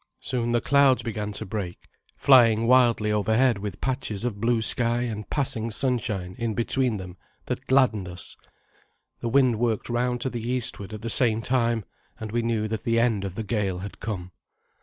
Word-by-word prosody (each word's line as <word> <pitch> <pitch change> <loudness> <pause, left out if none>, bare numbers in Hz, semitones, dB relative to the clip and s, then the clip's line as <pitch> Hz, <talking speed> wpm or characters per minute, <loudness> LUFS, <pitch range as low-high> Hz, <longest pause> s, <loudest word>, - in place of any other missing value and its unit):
Soon 120 -2 -2
the 120 -1 +2
clouds 140 -1 +4
began 105 -2 -4
to - - -4
break, 95 -3 -6 0.3
flying 115 -4 +5
wildly 120 -3 +4
overhead 110 +3 +2
with 100 -2 -6
patches 125 -5 -2
of 105 -4 -3
blue 120 0 +2
sky 120 +1 +1
and 110 -4 -4
passing 115 -6 -1
sunshine 105 -7 -1
in 115 -2 -2
between 120 -1 +1
them 90 -1 -9 0.3
that - - -5
gladdened 125 -8 +3
us. 90 0 -8 0.8
The 120 - -3
wind 125 -3 +3
worked 115 -2 -1
round 120 +1 0
to 130 - -2
the 120 - -4
eastward 115 -4 -2
at 110 0 -8
the 115 - -3
same 115 -2 +2
time, 120 -4 0 0.3
and 110 -1 -6
we 120 +1 0
knew 115 -2 -1
that 110 -1 -3
the 115 -2 +1
end 115 -4 +1
of 95 -2 -5
the 110 - -3
gale 100 -3 -1
had 100 +3 -8
come. 90 -5 -5
115 Hz, 180 wpm, -25 LUFS, 105-120 Hz, 0.8 s, flying